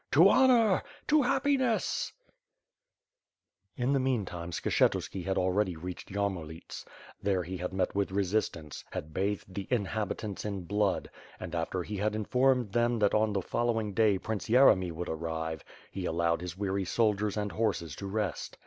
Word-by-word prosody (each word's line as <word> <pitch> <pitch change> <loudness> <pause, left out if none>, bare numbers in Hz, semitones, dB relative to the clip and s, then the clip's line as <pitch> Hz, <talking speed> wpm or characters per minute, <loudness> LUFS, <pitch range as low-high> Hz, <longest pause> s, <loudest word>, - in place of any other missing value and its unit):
"To 165 +8 +8
honor! 235 -6 +5 0.3
To 305 0 +5
happiness 265 -3 +1 0.2
^ - - -34 1.5
In 125 +3 +2
the 135 - +3
meantime 100 -10 -2
Skshetuski 90 +1 0
had 95 0 0
already 95 0 +1
reached 90 +3 -7
Yarmo 100 -3 -1
liets. 80 +1 -9 0.4
There 95 -2 +1
he 90 +3 -5
had 90 +1 -4
met 95 -1 -1
with 100 0 0
resistance, 95 -6 -1
had 75 +1 -6
bathed 100 0 -2
the 100 0 -5
in 120 -6 +1
habitants 105 -1 -3
in 100 -3 -4
blood; 100 +2 0 0.3
and, 85 - -7
after 85 +2 -2
he 105 +3 -5
had 105 +2 0
informed 125 +1 +2
them 120 +2 +2
that 105 -2 +2
on 110 0 +3
the 100 -2 -1
following 115 -2 -1
day 105 -2 +3
Prince 110 +2 -4
Yeremy 110 -8 +5
would 85 +2 -5
arrive, 80 0 -3 0.3
he 95 -2 -4
allowed 85 0 +1
his 90 0 -6
weary 100 -1 -1
soldiers 105 0 +1
and 105 -1 -1
horses 100 -9 -1
to 100 - -5
rest. 100 -4 -3
100 Hz, 165 wpm, -30 LUFS, 90-110 Hz, 1.5 s, To